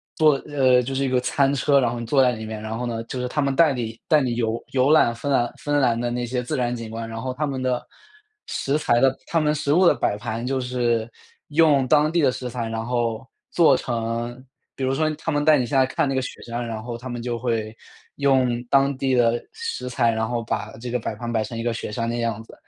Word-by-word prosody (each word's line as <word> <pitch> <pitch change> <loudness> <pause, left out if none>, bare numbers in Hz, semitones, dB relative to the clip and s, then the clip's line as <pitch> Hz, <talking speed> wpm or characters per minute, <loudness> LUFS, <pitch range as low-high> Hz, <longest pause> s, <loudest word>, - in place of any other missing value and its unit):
做， 155 -1 +5
呃 130 -3 +4
就 135 +2 -4
是 135 - 0
一 135 - 0
个 130 0 +2
餐 135 +2 +1
车， 140 +1 +3
然 120 -2 +1
后 120 - -4
你 115 - -5
坐 135 +4 +3
在 125 - +4
里 110 -2 -6
面， 110 -1 -6
然 110 +1 -4
后 125 - -3
呢 115 -1 -3
就 125 +2 -6
是 125 - -2
他 150 +4 -1
们 140 -1 +1
带 155 -1 +5
你 115 -2 -5
带 155 -3 +4
你 125 -3 -1
游 115 -1 -1
游 135 +2 +3
览 155 -6 +5
芬 115 +5 -5
兰 120 -4 +2
芬 145 0 -1
兰 120 -4 +2
的 120 - -1
那 120 0 -2
些 125 +1 -2
自 125 - -3
然 120 -1 0
景 115 -2 -6
观。 115 +1 -5
然 115 0 -6
后 130 +1 -3
他 150 +4 -2
们 135 -2 -3
的 125 -1 -1 0.6
食 140 +2 -1
材 120 -6 +2
的 135 0 +3
他 165 - +1
们 150 -1 +2
食 145 -1 -1
物 185 +4 +5
的 - - +5
摆 105 -4 0
盘 115 +2 -4
就 135 +1 -1
是 120 -2 0 0.4
用 145 -4 +4
当 150 +1 +4
地 170 0 +2
的 135 -3 +4
食 125 0 -5
材， 115 -2 -4
然 115 0 -3
后 120 -1 -1 0.2
做 165 -5 +5
成 120 +1 -3 0.3
比 135 - -5
如 130 0 +1
说 155 +3 +1
他 160 +2 -4
们 145 -1 0
带 155 0 +6
你 125 - 0
下 135 +3 0
来 130 - +5
看 135 - 0
那 135 - -1
个 130 - +1
雪 125 - -7
山， 120 +1 -4
然 110 -1 -5
后 120 0 -5
他 125 +2 -8
们 120 -1 -4
就 120 -1 -3
会 115 -3 -2 0.4
用 130 -4 +2
当 140 0 +3
地 130 -1 +1
的 120 -1 +2
食 455 - -4
材， 120 -2 +2
然 110 0 -1
后 120 -1 -2
把 110 -1 -3
这 120 +1 -6
个 125 - 0
摆 110 - -4
盘 120 +2 -5
摆 110 -2 +1
成 115 +2 -6
一 115 - -3
个 120 -1 0
雪 115 - -5
山 115 +1 -2
的 120 - -2
样 115 -2 -2
子。 - - -16
125 Hz, 290 characters per minute, -23 LUFS, 115-135 Hz, 0.6 s, 带